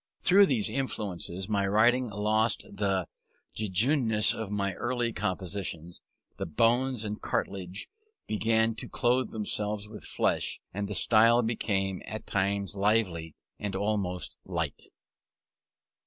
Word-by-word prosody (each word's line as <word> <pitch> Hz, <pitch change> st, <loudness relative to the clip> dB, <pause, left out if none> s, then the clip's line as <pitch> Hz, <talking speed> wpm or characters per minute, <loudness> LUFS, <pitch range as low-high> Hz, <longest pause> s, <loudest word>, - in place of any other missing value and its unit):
Through 195 Hz, +2 st, +7 dB
these 115 Hz, -7 st, +2 dB
influences 95 Hz, -8 st, -3 dB
my 100 Hz, -2 st, +1 dB
writing 120 Hz, +5 st, +3 dB
lost 105 Hz, +2 st, +1 dB
the 100 Hz, -3 st, -1 dB, 0.5 s
jejuneness 110 Hz, -, +3 dB
of 110 Hz, -3 st, -5 dB
my 100 Hz, -1 st, -1 dB
early 120 Hz, +2 st, -1 dB
compositions; 90 Hz, -3 st, -4 dB, 0.4 s
the -, -, -3 dB
bones 120 Hz, -, +2 dB
and 105 Hz, 0 st, -4 dB
cartilages 95 Hz, -1 st, -3 dB, 0.4 s
began 110 Hz, +1 st, +2 dB
to -, -, -7 dB
clothe 125 Hz, +1 st, +1 dB
themselves 105 Hz, -1 st, -2 dB
with 105 Hz, 0 st, -10 dB
flesh, -, -, 0 dB
and 100 Hz, +1 st, -2 dB
the 100 Hz, -, -4 dB
style 115 Hz, +3 st, +5 dB
became, 95 Hz, -4 st, -1 dB
at 110 Hz, -, -6 dB
times, 100 Hz, 0 st, 0 dB
lively 95 Hz, -6 st, +1 dB, 0.2 s
and 100 Hz, -2 st, -3 dB
almost 100 Hz, -3 st, -2 dB
light. -, -, -3 dB
105 Hz, 120 wpm, -29 LUFS, 95-115 Hz, 0.5 s, Through